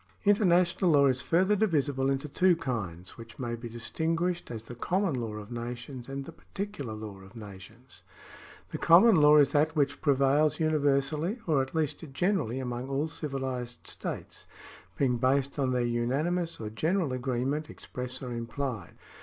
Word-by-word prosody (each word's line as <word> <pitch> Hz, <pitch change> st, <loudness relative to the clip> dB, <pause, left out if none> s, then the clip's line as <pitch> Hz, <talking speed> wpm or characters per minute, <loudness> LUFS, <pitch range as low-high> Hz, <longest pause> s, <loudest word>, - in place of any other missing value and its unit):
International 185 Hz, -3 st, +3 dB
law 145 Hz, -3 st, +5 dB
is 130 Hz, -1 st, +2 dB
further 185 Hz, +9 st, +2 dB
divisible 145 Hz, -10 st, +1 dB
into 135 Hz, +2 st, -1 dB
two 180 Hz, +5 st, +3 dB
kinds, 100 Hz, -, -5 dB
which 115 Hz, 0 st, -11 dB
may 120 Hz, -3 st, -3 dB
be 120 Hz, 0 st, -6 dB
distinguished 165 Hz, +9 st, -2 dB
as 115 Hz, -2 st, -6 dB
the 120 Hz, -, -9 dB
common 180 Hz, -, 0 dB
law 115 Hz, -4 st, -3 dB
of 105 Hz, +1 st, -8 dB
nations 120 Hz, +2 st, -6 dB
and 135 Hz, 0 st, -5 dB
the -, -, -8 dB
particular 190 Hz, -, -6 dB
law 105 Hz, -2 st, -8 dB
of 95 Hz, +4 st, -15 dB
nations. 110 Hz, +4 st, -11 dB, 0.7 s
The -, -, -4 dB
common 190 Hz, +8 st, +7 dB
law 150 Hz, -1 st, +7 dB
is 145 Hz, -2 st, +5 dB
that 155 Hz, +2 st, +2 dB
which 140 Hz, -1 st, 0 dB
prevails 140 Hz, +1 st, +3 dB
universally 155 Hz, -, +1 dB
or 150 Hz, -5 st, +2 dB
at 130 Hz, +4 st, -5 dB
least 155 Hz, 0 st, -1 dB
generally 175 Hz, -, 0 dB
among 125 Hz, 0 st, -4 dB
all 140 Hz, +2 st, 0 dB
civilised 130 Hz, -5 st, -4 dB
states, -, -, -6 dB, 0.5 s
being 125 Hz, -3 st, +2 dB
based 135 Hz, +3 st, +1 dB
on 130 Hz, -2 st, +1 dB
their 125 Hz, -1 st, +1 dB
unanimous 145 Hz, +9 st, -1 dB
or 105 Hz, -1 st, -5 dB
general 160 Hz, -, 0 dB
agreement, 130 Hz, +4 st, -2 dB
express 125 Hz, +1 st, -6 dB
or 125 Hz, -1 st, -4 dB
implied. 115 Hz, 0 st, -4 dB
135 Hz, 160 wpm, -29 LUFS, 120-160 Hz, 0.7 s, common